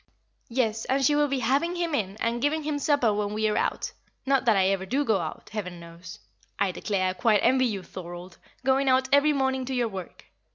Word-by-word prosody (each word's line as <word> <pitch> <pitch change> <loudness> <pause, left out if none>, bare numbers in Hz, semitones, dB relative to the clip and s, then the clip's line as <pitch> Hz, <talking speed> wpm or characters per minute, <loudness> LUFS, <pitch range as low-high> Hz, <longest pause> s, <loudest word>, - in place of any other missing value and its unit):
"Yes, 225 -3 0
and 270 +1 +1
she 295 - +4
will 295 0 +3
be 275 -2 -1
having 280 +9 +1
him 340 -2 -2
in, 205 -6 -2
and 230 +1 -1
giving 300 +3 0
him 295 -1 -2
supper 285 -7 +2
when 205 0 -2
we 215 0 +1
are 210 - 0
out - - -1 0.3
not 270 -1 +2
that 225 -4 +4
I 190 0 +3
ever 195 -1 0
do 275 +7 0
go 220 -5 +2
out, 160 -2 -6
Heaven 180 -5 -5
knows! 170 0 -11 0.4
I 195 - +1
declare 185 0 -1
I - - -2
quite 205 +3 +2
envy 255 +1 +4
you, 200 -5 -4
Thorold, 175 0 -9 0.3
going 270 +1 +3
out 260 0 +3
every 285 +2 +5
morning 265 -2 0
to 265 +1 -3
your 240 -2 +1
work. 190 -4 -9
230 Hz, 220 wpm, -26 LUFS, 195-275 Hz, 0.4 s, every